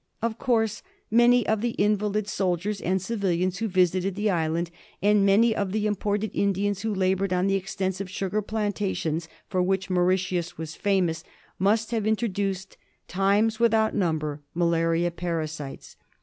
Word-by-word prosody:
Of 230 0 -2
course 225 -4 +1 0.3
many 240 +1 +5
of 220 -1 +1
the 235 0 -1
invalid 210 0 +1
soldiers 195 +1 -1
and 190 +2 +1
civilians 185 -3 -1
who 225 - 0
visited 185 0 +1
the 205 +1 +1
island, 165 0 -1 0.3
and 205 +1 +4
many 220 +3 +4
of 200 -3 -2
the 215 0 0
imported 205 0 -1
Indians 200 0 0
who 220 0 -1
laboured 190 0 +1
on 180 0 +1
the 195 - +2
extensive 190 0 -2
sugar 195 +3 -2
plantations 200 -6 -2 0.2
for 185 - 0
which 190 +1 0
Mauritius 180 -1 0
was 160 -1 -6
famous, 180 -5 0 0.4
must 215 +4 +2
have 220 -3 0
introduced, 195 -3 -1 0.3
times 205 +4 +2
without 225 -2 +3
number, 155 -6 -1
malaria 170 0 +1
parasites. 160 -5 -5
195 Hz, 145 wpm, -26 LUFS, 180-210 Hz, 0.4 s, many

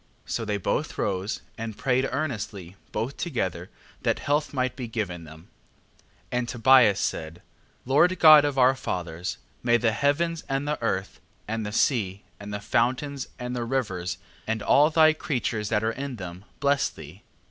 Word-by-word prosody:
So 115 - -3
they 105 -1 -1
both 100 - -2
arose, 95 +1 -2 0.2
and 110 -2 -5
prayed 130 0 +1
earnestly 105 - -4 0.2
both 115 +6 -3
together 95 - -3 0.3
that - - +1
health 150 +1 0
might 130 -2 -1
be 125 -3 -5
given 90 -7 -4
them, 80 +3 -14 0.5
8:7. - - -30 0.3
And 120 -1 -3
Tobias 120 -4 +5
said: 80 -3 -3 0.4
Lord 155 +8 +4
God 155 -3 +9
of 145 -2 -1
our 130 0 +6
fathers, 90 -8 -4 0.2
may 120 -1 +4
the 115 -1 +2
heavens 155 +7 0
and 135 +1 -1
the 150 -2 -2
earth, 95 -4 -2 0.3
and 110 +1 -2
the - - -4
sea, 105 -5 +1 0.2
and 100 0 -8
the 105 - -3
fountains, 130 +5 0
and 125 0 -4
the 120 - -2
rivers, 95 -9 -2 0.3
and 110 -1 -1
all 150 +2 +5
thy 155 -1 +5
creatures 115 -8 -2
that 105 -1 +1
are 110 - +1
in 135 +2 -5
them, 90 -2 -8
bless 140 0 +2
thee. 80 +6 -12
115 Hz, 170 wpm, -26 LUFS, 100-135 Hz, 0.5 s, God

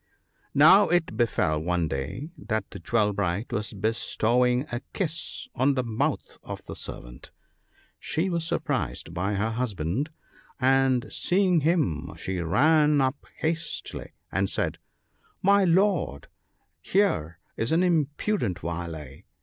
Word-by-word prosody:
»> - - -39
Now 175 +8 +7
it 175 -1 +1
befell 80 -10 +1
one 85 0 0
day 80 - -4
that 110 -8 -2
as 100 - -8
Jewel 105 +2 +1
bright 100 +3 -2
was 110 -2 -2
bestowing 120 +4 +1
a 120 +1 -3
kiss 175 +7 -3
on 135 +2 +2
the 130 - 0
mouth 125 +6 -2
of - - -8
the - - -7
servant, - - -8 0.7
she 165 +4 -1
was 170 -3 -1
surprised 145 - -2
by 95 +4 -1
her 110 +3 0
husband; 110 - -2 0.5
and 130 -1 +3
seeing 185 -2 +3
him 150 - 0
she 95 -1 -3
ran 150 - +4
up 130 +1 -1
hastily 165 +1 -3 0.2
and 95 0 0
said, - - -1 0.3
" - - -38
My 200 +1 +5
lord, 180 - +1 0.5
here 85 - +1 0.2
is 115 - -1
an 165 +3 +3
impudent 155 - 0
varlet 85 -2 -6
125 Hz, 135 wpm, -26 LUFS, -, 0.7 s, Now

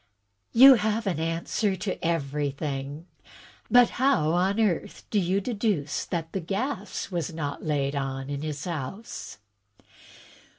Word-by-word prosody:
"You 265 +3 +10
have 220 +1 0
an 180 -5 -1
answer 165 +5 -1
to 190 +1 -3
everjrthing. 145 -1 -2 0.6
But 245 -1 +6
how 260 - +3
on 190 +5 +1
earth 205 -7 0
do 210 - +3
you 190 +1 +1
deduce 200 - -1
that 165 -2 -3
the 195 - -1
gas 200 - -3
is 170 -2 -2
not 145 -3 -4
laid 145 -2 0
on 135 -1 -3
in 140 0 -4
his 150 -2 -4
house?" 175 - -6
170 Hz, 130 wpm, -27 LUFS, 145-205 Hz, 0.6 s, You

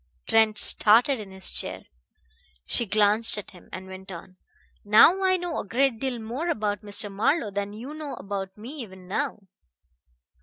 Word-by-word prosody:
Trent 220 -1 +2
started 235 +5 +6
in 205 -2 -9
his 190 0 -2
chair. - - -1 0.8
She 235 - +1
glanced 215 +2 +2
at 210 - -8
him, 180 - -17
and 185 0 -8
went 190 0 -11
on: 185 +1 -11 0.5
"Now 225 - +5
I 370 -1 +2
know 350 -2 -4
a - - -4
great 245 +2 0
deal 260 -1 -3
more 240 +10 -5
about 210 - -2
Mr. 205 0 -1
Marlowe 215 +3 0
than 200 +1 -4
you 245 +7 -9
know 305 -2 -7
about 195 -1 -7
me 245 +8 -10
even 190 -5 -12
now. 230 +1 -4
215 Hz, 165 wpm, -25 LUFS, 200-260 Hz, 0.8 s, started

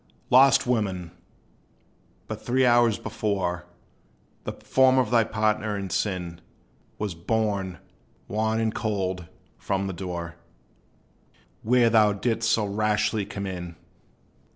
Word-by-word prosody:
Lost 135 +1 +6
woman! 95 -8 -1 1.2
but - - -6
three 130 +2 +2
hours 120 -3 +4
before, 95 -5 -2 0.8
The - - -3
form 130 0 +3
of 130 - +2
thy 115 -2 +5
partner 110 -1 0
in 95 -1 -5
sin 90 -4 -2 0.6
Was 105 -3 -3
borne, 100 0 -1 0.5
wan 110 +1 0
and 110 -1 0
cold, 95 -5 -2 0.3
from 95 0 -1
the 95 - -3
door, 85 -2 -6 1.2
Where 120 0 +3
thou 105 -2 +5
didst 115 +2 -1
so 110 -2 +2
rashly 105 0 0
come 100 -1 -5
in. 90 -3 -6
105 Hz, 115 wpm, -25 LUFS, 95-115 Hz, 1.2 s, Lost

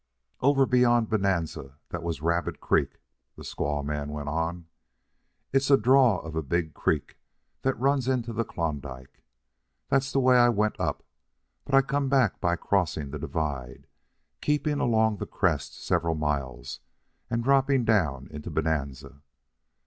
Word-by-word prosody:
"Over 135 0 +4
beyond 120 -3 +3
Bonanza 90 -10 -1
that 85 - -5
was 80 -3 -4
Rabbit 85 +1 -1
Creek," - - 0 0.4
the - - -11
squaw 75 -1 -3
man 75 0 -3
went 75 -1 -5
on. 80 +2 -2 0.9
"It's 135 0 +2
a 140 - +7
draw 125 -3 +4
of 80 -1 -8
a 80 - 0
big 80 +2 -2
creek 75 -2 -2 0.4
that 135 -2 -1
runs 135 0 +1
into 120 -3 -1
the 115 +1 0
Klondike. 70 - -5 0.7
That's 135 0 +1
the 135 - +2
way 130 -1 +5
I 120 0 +6
went 110 -2 0
up, - - -2 0.6
but 135 - +1
I 135 - +6
come 140 0 -1
back 130 -7 +2
by 85 -1 +2
crossing 80 -6 -1
the 75 - -5
divide, 70 -5 -4 0.6
keeping 150 0 0
along 110 -2 +2
the - - -5
crest - - -1
several 85 -1 0
miles, 70 -5 -3 0.5
and 115 0 -1
dropping 135 -1 +3
down 75 - +1
into 75 0 -7
Bonanza. 70 -3 -3
90 Hz, 150 wpm, -27 LUFS, -, 0.9 s, a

